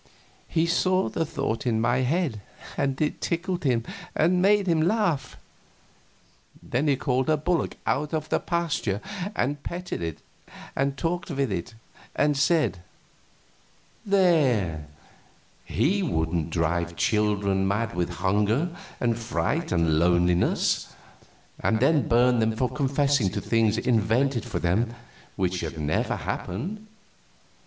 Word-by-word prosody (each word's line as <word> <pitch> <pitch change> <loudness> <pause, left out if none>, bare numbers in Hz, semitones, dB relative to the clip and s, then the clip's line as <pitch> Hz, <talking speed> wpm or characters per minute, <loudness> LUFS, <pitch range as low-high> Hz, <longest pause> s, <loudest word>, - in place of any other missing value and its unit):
He 165 0 +2
saw 185 +2 +2
the 165 -1 -2
thought 135 -5 -2
in 110 -2 +2
my 120 +2 +2
head, 130 - 0 0.3
and 135 -1 -1
it 150 - -1
tickled 180 +1 -2
him 120 -4 +2 0.3
and 180 +3 +3
made 200 +1 +4
him 165 -3 +2
laugh. 180 -4 0 1.3
Then 135 +5 -1
he 140 - +4
called 130 +1 0
a 155 - +4
bullock 170 +3 -1
out 150 +1 0
of 155 -1 -3
a - - +3
pasture 165 - -1 0.4
and 145 +3 -1
petted 180 - -5
it 80 -2 -3 0.6
and 135 0 0
talked 175 +4 -2
with 140 -6 -1
it, 95 +4 -4 0.4
and 150 -1 +2
said: 145 - +2 1.2
"There 135 - +2 0.8
he 200 +6 +1
wouldn't 80 - -1
drive 85 +1 -1
children 100 0 +1
mad 105 +3 -1
with 90 0 -1
hunger 105 - 0 0.2
and 120 -1 +1
fright 145 +8 -1
and 80 -3 +2
loneliness, 90 +1 +2 0.6
and 110 - +1
then 140 +1 +3
burn 120 +1 +4
them 110 0 +1
for 125 +2 0
confessing 140 -5 +1
to 105 - -1
things 110 +1 +1
invented 120 +2 +1
for - - -4
them 110 +8 0 0.4
which 90 -2 -1
had 80 -1 -5
never 75 0 0
happened. 190 - -5
125 Hz, 130 wpm, -26 LUFS, 100-160 Hz, 1.3 s, made